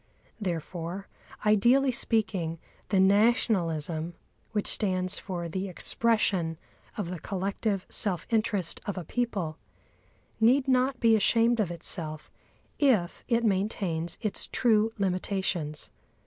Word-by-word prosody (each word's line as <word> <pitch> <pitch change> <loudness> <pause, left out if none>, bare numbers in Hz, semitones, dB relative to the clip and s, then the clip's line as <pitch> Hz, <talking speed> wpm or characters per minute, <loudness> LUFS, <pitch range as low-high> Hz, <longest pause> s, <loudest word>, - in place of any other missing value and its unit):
Therefore, 175 0 -4 0.4
ideally 240 +6 +4
speaking, 205 -9 0 0.3
the 195 - +3
nationalism, 180 -6 +2 0.4
which 210 -2 -1
stands 185 -3 0
for 175 -3 -4
the 185 +4 -3
expression 185 -4 +1 0.4
of 190 -5 -3
the 180 - -5
collective 195 +2 -2
self 185 -6 -1
interest 215 -6 0
of 200 - -3
a 180 - -3
people, 195 -8 -2 0.8
need 255 +5 +4
not 260 0 +2
be 225 -1 +5
ashamed 230 +2 +3
of 205 -5 +1
itself 160 -2 -5 0.5
if 230 - +2
it 235 -1 +2
maintains 190 -5 -1
its 215 - 0
true 225 -2 +3
limitations. 185 -5 -2
195 Hz, 110 wpm, -28 LUFS, 175-225 Hz, 0.8 s, be